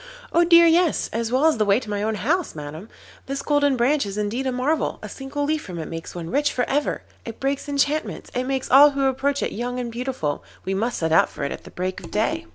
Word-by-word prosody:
'Oh 340 Hz, -, +5 dB
dear, 340 Hz, 0 st, +7 dB
yes! 335 Hz, 0 st, +3 dB
as 230 Hz, 0 st, -2 dB
well 260 Hz, +4 st, +3 dB
as 320 Hz, -4 st, +4 dB
the -, -, +4 dB
way 200 Hz, +2 st, +4 dB
to 255 Hz, -, -11 dB
my 205 Hz, -1 st, -2 dB
own 220 Hz, +1 st, 0 dB
house, 305 Hz, -, -1 dB
Madam. 155 Hz, +7 st, -8 dB, 0.4 s
This 275 Hz, 0 st, -3 dB
Golden 285 Hz, -2 st, +2 dB
Branch 275 Hz, +5 st, +2 dB
is 200 Hz, 0 st, -5 dB
indeed 220 Hz, +6 st, -1 dB
a -, -, +1 dB
marvel, 260 Hz, +6 st, 0 dB
a -, -, -5 dB
single 275 Hz, +2 st, -5 dB
leaf 305 Hz, +1 st, 0 dB
from 180 Hz, -3 st, -8 dB
it 160 Hz, -, -5 dB
makes 165 Hz, +1 st, -7 dB
one 170 Hz, -1 st, -6 dB
rich 285 Hz, +3 st, +2 dB
for 250 Hz, -, -1 dB
ever. 290 Hz, +2 st, -1 dB, 0.2 s
It 230 Hz, -1 st, -8 dB
breaks 275 Hz, +2 st, -2 dB
enchantments, 285 Hz, +2 st, -1 dB
and 250 Hz, +1 st, -2 dB
makes 265 Hz, -1 st, -2 dB
all 280 Hz, +3 st, +9 dB
who 280 Hz, -1 st, -2 dB
approach 275 Hz, +1 st, 0 dB
it -, -, -1 dB
young 245 Hz, +3 st, -3 dB
and 240 Hz, -1 st, -4 dB
beautiful. 240 Hz, -, -3 dB, 0.2 s
We 190 Hz, -, -1 dB
must 225 Hz, +5 st, -1 dB
set 160 Hz, -1 st, -1 dB
out 165 Hz, -, +5 dB
for -, -, -7 dB
it 140 Hz, -, -2 dB
at -, -, -7 dB
the -, -, -10 dB
break 185 Hz, +1 st, -4 dB
of -, -, -9 dB
day. 320 Hz, +11 st, -1 dB
255 Hz, 255 wpm, -23 LUFS, 210-285 Hz, 0.4 s, all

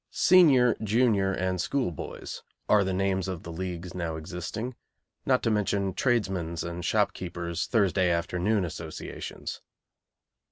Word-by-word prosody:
Senior, 140 Hz, -, +5 dB
junior, 105 Hz, -3 st, +3 dB
and 95 Hz, -1 st, -1 dB
school 130 Hz, -2 st, 0 dB
boys' 80 Hz, -, -7 dB, 0.3 s
are 105 Hz, -1 st, +5 dB
the 95 Hz, -, -1 dB
names 95 Hz, 0 st, 0 dB
of 95 Hz, -3 st, -4 dB
the 85 Hz, -, -7 dB
leagues 90 Hz, 0 st, -5 dB
now 85 Hz, -3 st, -3 dB
existing, 90 Hz, +9 st, -5 dB, 0.5 s
not 130 Hz, -1 st, +3 dB
to 115 Hz, -, +2 dB
mention 100 Hz, -2 st, 0 dB
tradesmen's 95 Hz, -9 st, 0 dB
and 85 Hz, +1 st, -5 dB
shopkeepers' 85 Hz, -1 st, -1 dB
Thursday 95 Hz, -5 st, +2 dB
afternoon 90 Hz, +4 st, +1 dB
associations. 80 Hz, -1 st, -6 dB
95 Hz, 125 wpm, -28 LUFS, 85-110 Hz, 0.5 s, Senior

